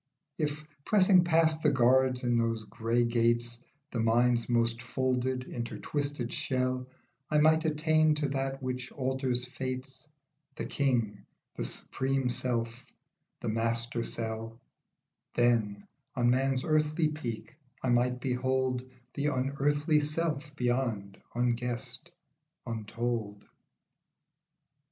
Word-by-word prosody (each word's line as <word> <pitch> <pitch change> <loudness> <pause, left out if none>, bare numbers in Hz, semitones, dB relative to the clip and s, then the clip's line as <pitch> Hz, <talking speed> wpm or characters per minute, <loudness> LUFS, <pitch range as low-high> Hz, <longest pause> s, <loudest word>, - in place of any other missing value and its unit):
If, 150 0 -1 0.2
pressing 185 -2 +5
past 160 -2 +3
the - - +4
guards 130 0 +3
in 120 -1 +2
those 115 -1 +1
grey 115 +3 0
gates, 120 0 +1 0.3
The 120 - -2
brain's 120 +1 +3
most 115 -1 +1
folded, 130 +1 -1
intertwisted 130 +2 -3
shell, 130 -1 -1 0.4
I 150 - +2
might 160 +1 +4
attain 155 0 +3
to 150 -1 0
that 135 0 -2
which 130 0 -3
alters 130 -2 0
fates, 130 +2 -6 0.5
The - - -4
King, 115 -8 0 0.3
the - - -3
supreme 135 - -1
self, 120 -1 -2 0.6
the - - -2
Master 115 +1 0
Cell; 115 0 -4 0.8
Then, 110 -4 +2 0.3
on 120 -2 +3
Man's 130 0 +1
earthly 155 +1 +2
peak, 130 -6 -6 0.3
I 130 - +1
might 125 +1 +2
behold 130 0 0 0.3
The 145 +1 -1
unearthly 145 +3 +1
self 150 -1 -2
beyond, 120 -6 -1
unguessed, 120 +5 -2 0.6
untold. 115 -2 -3
125 Hz, 110 wpm, -30 LUFS, 120-140 Hz, 0.8 s, pressing